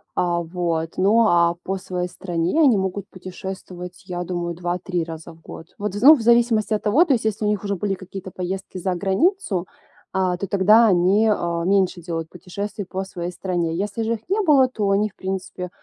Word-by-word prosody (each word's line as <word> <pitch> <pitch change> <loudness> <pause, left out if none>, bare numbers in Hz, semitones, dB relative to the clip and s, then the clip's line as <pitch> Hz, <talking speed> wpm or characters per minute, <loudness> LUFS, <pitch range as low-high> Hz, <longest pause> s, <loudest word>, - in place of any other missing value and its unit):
а, 175 -1 +1
вот. 165 -1 -2
Ну 205 +5 +4
а 170 -2 +3
по 195 +1 -2
своей 180 -1 -4
стране 175 - -2
они 270 -7 +6
могут 190 0 -2
путешествовать, 185 -1 -8
я 175 -1 -3
думаю, 175 -1 -3
2-3 175 0 -2
раза 165 0 -8
в 160 - -17
год. 165 - -10
Вот, 205 -1 -3
ну 300 +5 +9
в 240 - -4
зависимости 230 -2 +3
от 210 - -1
того, 275 +12 +4
то 300 - +2
есть 235 - 0
если 215 -1 -1
у - - +2
них 210 -1 0
уже 200 -1 -1
были 195 +2 -1
какие-то 190 0 -8
поездки 185 +1 -5
за 185 0 -1
границу, 195 - 0 0.4
а, 185 -1 +1
то 200 - -4
тогда 210 +5 +5
они, 190 +4 +3
э, 170 -5 0
меньше 185 -2 +2
делают 165 -1 -4
путешествий 200 +4 -6
по 190 +1 -4
своей 180 -2 -5
стране. 175 -3 -2
Если 205 +4 -2
же 225 +1 0
их - - -9
не 410 +3 +2
было, 290 -8 +5
то 215 -5 -2
они, 205 +2 +2
в - - -29
принципе, 185 -1 -5
190 Hz, 200 wpm, -22 LUFS, 175-210 Hz, 0.4 s, ну